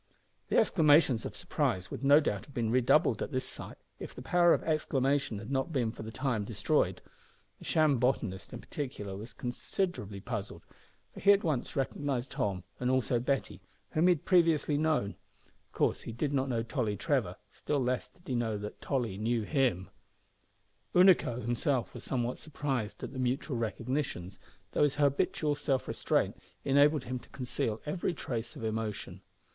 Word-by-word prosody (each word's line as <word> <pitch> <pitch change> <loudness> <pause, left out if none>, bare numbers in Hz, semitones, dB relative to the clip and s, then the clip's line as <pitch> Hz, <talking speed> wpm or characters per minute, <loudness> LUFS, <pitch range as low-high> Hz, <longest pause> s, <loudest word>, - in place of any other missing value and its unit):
The - - +2
exclamations 145 - +4
of - - -10
surprise 95 0 -1
would - - -6
no 140 +2 +7
doubt 105 -8 -2
have 140 - -17
been 115 -2 0
redoubled 125 0 +3
at - - -3
this - - -2
sight - - -8 0.2
if - - -8
the 125 - -8
power 175 +5 +4
of - - +3
exclamation 140 -6 +1
had 110 +5 -7
not 135 +4 0
been 125 -7 0
for - - -10
the 110 - -6
time 125 -3 -1
destroyed. 105 - 0 0.6
The - - -12
sham 155 -5 +3
botanist 115 -7 -1
in 125 - -7
particular 115 -9 -5
was 110 +4 -8
considerably 120 - -3
puzzled, 105 -1 -5 0.5
for - - -9
he 200 - +6
at 200 - +1
once 150 -7 -1
recognised 135 -1 -1
Tom 95 -3 -1 0.2
and 125 - 0
also 130 -2 +2
Betty, 135 +3 -1 0.3
whom 160 +3 +3
he 180 - +6
had 150 - -13
previously 165 -5 +3
known. 150 -9 +1 0.5
Of - - -42
course - - +1
he - - -6
did 140 +6 -2
not 135 -1 +1
know 115 -2 0
Tolly 115 -4 -1
Trevor; - - 0 0.2
still 150 - -2
less 125 -1 -1
did 175 - -27
he 130 - -3
know 115 -3 0
that 105 0 -7
Tolly 115 -8 -1
knew 115 +1 0
him. 120 - 0 1.0
Unaco 180 -10 +5
himself 120 +2 0
was - - -8
somewhat 125 -1 -2
surprised 135 -8 -3
at - - -5
the 130 - -5
mutual 130 +2 -1
recognitions, 115 -4 -3 0.3
though - - 0
his 145 -1 +3
habitual 145 +1 +2
self 145 -2 -1
restraint - - 0 0.3
enabled 145 +1 +4
him 125 +1 -4
to - - -18
conceal 120 -4 -2
every 170 +3 -1
trace 115 -5 -4
of - - -8
emotion. 110 -4 -3
130 Hz, 175 wpm, -31 LUFS, 110-145 Hz, 1.0 s, no